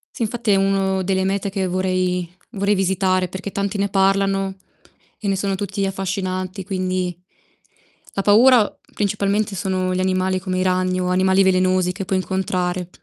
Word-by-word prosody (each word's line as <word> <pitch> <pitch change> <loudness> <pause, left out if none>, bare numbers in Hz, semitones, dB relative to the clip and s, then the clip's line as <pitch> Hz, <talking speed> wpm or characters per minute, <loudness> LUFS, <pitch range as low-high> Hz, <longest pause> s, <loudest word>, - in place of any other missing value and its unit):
Sì - - -2
infatti 230 0 -1
è - - +5
uno 195 -1 +1
delle 190 0 0
mete 195 +1 -1
che 190 -1 -2
vorrei 185 -1 0 0.2
vorrei 200 -2 +1
visitare 190 -1 +1
perché 190 +3 -6
tanti 200 +1 -2
ne 200 0 0
parlano 195 0 +1 0.6
e 210 - -4
ne 195 - +2
sono 195 0 -1
tutti 195 0 -2
affascinanti, 185 0 -3
quindi 185 -2 -2 1.0
la 195 - -1
paura 225 +2 +5 0.2
principalmente 205 0 0
sono 185 -1 -1
gli 185 - -1
animali 185 0 +1
come 185 -1 -2
i - - +1
ragni 185 0 +1
o 180 - -1
animali 190 +1 +3
velenosi 185 -1 +2
che 185 +1 -6
puoi 190 -1 0
incontrare, 185 -1 -2
190 Hz, 160 wpm, -21 LUFS, 185-195 Hz, 1.0 s, è